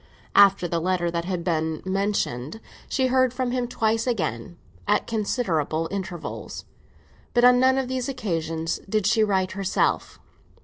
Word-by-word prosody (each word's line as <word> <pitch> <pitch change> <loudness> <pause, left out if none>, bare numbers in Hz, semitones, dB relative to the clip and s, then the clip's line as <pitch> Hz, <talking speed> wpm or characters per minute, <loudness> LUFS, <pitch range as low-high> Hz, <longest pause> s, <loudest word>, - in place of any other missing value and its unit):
After 195 -3 +6
the 170 -1 -1
letter 175 -1 0
that 170 0 -2
has 180 -1 -2
been 160 -2 -1
mentioned, 190 - -1 0.3
she 260 - +1
heard 255 -1 +3
from 255 -2 -1
him 250 -1 -1
twice 225 0 0
again, 170 - -2 0.3
at - - +2
considerable 170 - -1
intervals; 185 -4 -6 0.7
but 240 - +4
on 250 0 +7
none 260 +1 +4
of 265 -1 0
these 255 0 -2
occasions 165 -9 -2
did 215 -1 0
she 220 +2 +3
write 190 -3 +1
herself. 195 -1 -1
195 Hz, 145 wpm, -24 LUFS, 170-240 Hz, 0.7 s, on